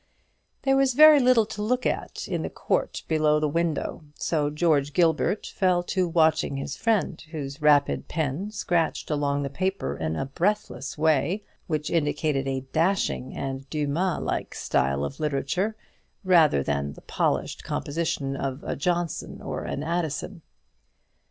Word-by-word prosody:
There 270 0 +3
was 270 -2 +3
very 305 0 +9
little 250 -4 +5
to 210 - -6
look 250 +4 0
at - - -2
in - - -2
the - - -3
court - - -2
below 155 -1 +3
the 150 - +1
window; 165 0 -1
so 150 -3 0
George 150 -2 +1
Gilbert 170 +4 +2
fell 180 -2 +1
to 185 -2 +2
watching 160 -3 +2
his 135 +1 -4
friend, 215 -7 0
whose 145 -2 -6
rapid 145 -1 +3
pen 160 +5 -2
scratched 175 -7 -1
along 145 -1 0
the 140 - -2
paper 190 +6 -2
in 80 0 -2
a 135 - -2
breathless 170 -1 -2
way, 160 +6 +2 0.2
which 155 -2 -2
indicated 145 -3 0
a 135 -1 -1
dashing 165 -6 0
and 135 0 -5
Dumas 155 +5 -1
like - - -3
style 70 +1 0
of 70 - -7
literature, 155 +8 -1 0.5
rather 165 - +5
than 70 0 -2
the - - -14
polished - - -1
composition 145 -3 -2
of 135 0 -4
a - - -3
Johnson 175 +2 -2
or - - -5
an 140 - -3
Addison. 170 +2 -3
155 Hz, 150 wpm, -26 LUFS, 140-180 Hz, 0.5 s, very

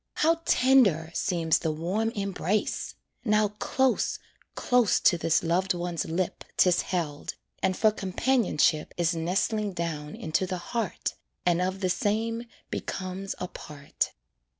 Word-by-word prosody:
How 330 +1 +2
tender 215 -12 +4
seems 165 -3 +1
the 160 - -1
warm 180 +8 -1
embrace! 200 0 -1 0.3
Now 215 -2 +3
close, 265 -1 +1 0.4
close 245 -3 +3
to 180 - +5
this 165 -1 +1
loved 180 +3 +1
one's 175 -3 -2
lip 175 +2 -2
'Tis 180 -1 +5
held, 160 -6 -3 0.3
and 185 -1 +1
for 215 -1 +4
companionship 195 - +1
Is 175 0 +2
nestling 195 +5 0
down 160 -4 -4
into 160 +4 -1
the 185 - -2 0.2
heart, 230 -6 -1 0.3
And 175 0 +3
of 185 +2 -1
the 185 - +1
same 225 +4 -1 0.3
becomes 190 +1 -4
a 180 - -4
part. 145 -4 -4
185 Hz, 130 wpm, -27 LUFS, 170-215 Hz, 0.4 s, to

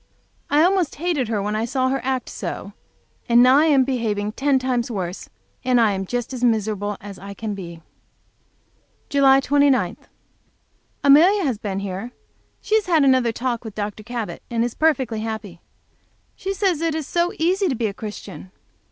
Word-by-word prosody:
I 295 +2 +4
almost 365 -3 +2
hated 310 -6 -1
her 215 -3 -1
when 210 +1 -2
I 215 - -1
saw 255 +2 0
her 270 +1 -1
act 260 -1 -2
so, - - -6 0.6
and 235 +1 +6
now 260 +3 +6
I 310 - +4
am 280 -4 +5
behaving 220 -6 -1
ten 275 +4 +1
times 255 -2 -1
worse 185 -5 -5 0.3
and 250 -1 +3
I 225 -3 +4
am 195 -1 -3
just 245 +3 -3
as 250 -1 -5
miserable 210 -3 0
as 200 -1 -10
I 200 +1 -9
can 215 +1 -4
be. 170 -4 -9 1.3
July 270 -1 +5
29. 285 -1 +2 1.1
Amelia 340 +9 +6
has 255 -9 -1
been 195 -2 -3
here. 200 +5 -5 0.5
She - - -4
has 400 - -17
had 325 -4 +4
her 255 -3 +3
talk 240 0 -3
with 220 -3 -8
Dr. 210 0 -4
Cabot 235 0 -5
and 230 -1 0
is 240 -1 -2
perfectly 265 -8 +1
happy. 215 -5 -6 0.7
She 390 - -4
says 370 -6 0
it 330 -2 0
is 315 -2 -3
so 345 +4 0
easy 370 +4 +1
to 275 - 0
be 230 -1 -2
a 205 - -1
Christian! 205 -3 -8
245 Hz, 180 wpm, -22 LUFS, 210-285 Hz, 1.3 s, and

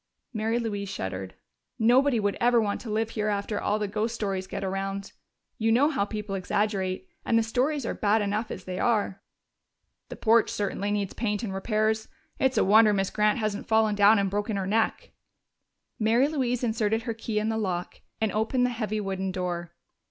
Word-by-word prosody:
Mary 220 +1 0
Louise 205 -4 -3
shuddered. 95 - -5 0.4
"Nobody 245 +2 +4
would 205 -1 0
ever 240 0 +5
want 205 -2 -1
to 235 - -8
live 220 +1 -1
here 215 -1 -2
after 205 0 -1
all 210 - +1
the 210 -1 -2
ghost 215 +3 -2
stories 195 -4 -2
get - - -5
around. 195 +1 -3 0.5
You 225 0 +2
know 265 +6 +4
how 235 -10 0
people 210 -1 -5
exaggerate, 190 -1 -1 0.2
and 230 - +2
the 230 - +3
stories 260 +4 0
are - - -1
bad 210 +1 +2
enough 210 +2 -1
as 185 - -6
they 185 0 -5
are." 205 -4 0 0.9
"The - - -6
porch 225 0 +3
certainly 205 0 -2
needs 205 -2 -1
paint 210 -1 -2
and 200 -4 -3
repairs. 215 +2 0 0.3
It's 265 0 +2
a - - +4
wonder 215 +2 +6
Miss 195 -1 0
Grant 210 0 +2
hasn't 215 -3 -2
fallen 220 -1 +3
down 205 +2 +6
and 200 -1 +2
broken 205 +2 -2
her 195 - -2
neck." 225 - 0 0.9
Mary 230 +5 +3
Louise 255 -5 -1
inserted 220 -1 0
her 230 - -2
key 220 -1 -4
in 215 +1 +1
the 220 - -1
lock 180 -4 -3 0.2
and 220 -1 +1
opened 225 +4 +1
the 250 - 0
heavy 215 -2 -2
wooden 190 -1 -2
door. 175 -2 -4
215 Hz, 190 wpm, -27 LUFS, 200-225 Hz, 0.9 s, wonder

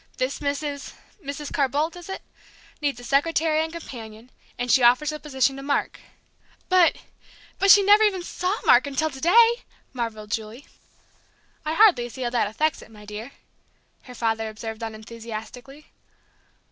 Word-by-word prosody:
This 255 +1 -2
Mrs. 285 0 -3 0.3
Mrs. 285 +1 -6
Carr 275 -2 +2
Boldt 305 +6 -1
is 350 +1 -11
it? 385 - -6 0.6
needs 285 -4 -1
a - - -11
secretary 310 +4 +1
and 320 - -5
companion; 235 -7 -10 0.3
and 245 0 -1
she 260 - +5
offers 250 +5 +4
the 305 - -6
position 270 -2 0
to - - -7
Mark." 280 +1 -1 0.7
"But 365 -2 +5 0.6
but 390 - +3
she 405 0 +9
never 410 +2 +6
even 395 -4 +2
saw 365 +3 -2
Mark - - +5
until 310 +3 -1
to 265 -1 -10
day!" 455 - +7 0.5
marvelled 220 -4 -5
Julie. 225 +5 -5 1.0
"I 310 +1 -2
hardly 340 - +5
see 260 +2 -7
how 240 - -2
that 240 -4 +1
affects 300 +9 -1
it, - - -14
my 210 -1 -14
dear!" 215 +5 -8 0.7
her 250 - -11
father 225 -1 -1
observed 220 +1 -7
unenthusiastically. 230 +5 -9
275 Hz, 160 wpm, -24 LUFS, 230-315 Hz, 1.0 s, she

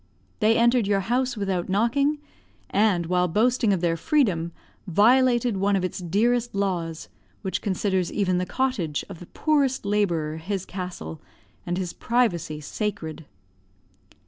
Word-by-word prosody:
They 220 +1 +4
entered 235 -2 +3
your 200 -1 +2
house 245 +4 0
without 190 -4 -2
knocking; 245 +9 +2 0.5
and 200 -5 +2
while 180 +1 +2
boasting 225 +5 +2
of 190 -4 +1
their 170 -2 +1
freedom, 175 - +1 0.4
violated 240 +3 +4
one 200 +1 +2
of 190 - 0
its 185 - -4
dearest 230 +7 +1
laws, 175 -5 -2 0.4
which 190 - -2
considers 190 -2 0
even 185 -3 +1
the 180 - -2
cottage 195 - -1
of 165 - -9
the 175 - -11
poorest 280 -6 +1
labourer 170 -7 0
his 190 +3 -4
castle, 180 - -6 0.5
and 175 +1 -1
his 180 -2 -3
privacy 185 -11 0
sacred. 160 -2 -4
195 Hz, 140 wpm, -25 LUFS, 175-235 Hz, 0.5 s, They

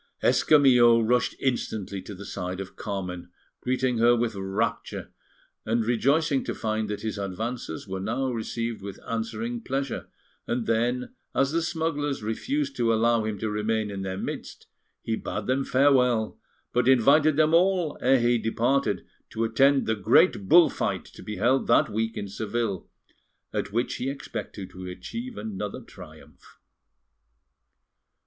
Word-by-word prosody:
Escamillo 125 -6 +5
rushed 120 +2 +1
instantly 110 -6 -2
to 100 - -9
the 100 +2 -9
side 90 0 -4
of 95 -1 -7
Carmen, 90 -4 -5 0.3
greeting 130 -1 0
her 120 +1 +5
with 120 -1 0
rapture, 100 +3 -3 0.5
and 115 +1 0
rejoicing 140 +5 +2
to - - -4
find 110 -1 -2
that 105 - -4
his 110 -2 -3
advances 100 -1 -4
were 95 0 -4
now 120 +7 -1
received 115 -1 -3
with 100 -1 -8
answering 115 0 -3
pleasure; 135 +1 -3 0.4
and 120 -1 -1
then, 120 - 0 0.2
as 135 +1 +2
the 165 +1 +1
smugglers 160 -6 -2
refused 280 - -2
to 115 -1 +2
allow 115 0 +3
him 110 -1 -3
to 110 - -3
remain 105 0 -1
in 100 -1 -5
their 95 -1 -4
midst, - - -6 0.4
he 110 - -1
bade 105 -1 -4
them 130 +3 +1
farewell, 125 -5 +3 0.3
but 125 0 +2
invited 140 +4 +5
them 155 +1 +3
all 180 -2 +3
ere 130 +1 +4
he 120 0 +3
departed 115 -2 0 0.2
to 115 - -2
attend 135 +5 +3
the 110 - +1
great 100 0 +3
bull 170 -2 +8
fight - - -2
to - - -14
be 105 - -6
held 125 +7 +2
that 115 - +4
week 110 +1 -2
in 100 - -4
Seville, 105 -1 -3 0.6
at - - -2
which 120 +4 -1
he 130 - -2
expected 105 -8 -6
to 90 0 -8
achieve 235 - -7
another 105 -1 -5
triumph. - - -15
115 Hz, 150 wpm, -26 LUFS, 105-135 Hz, 0.6 s, bull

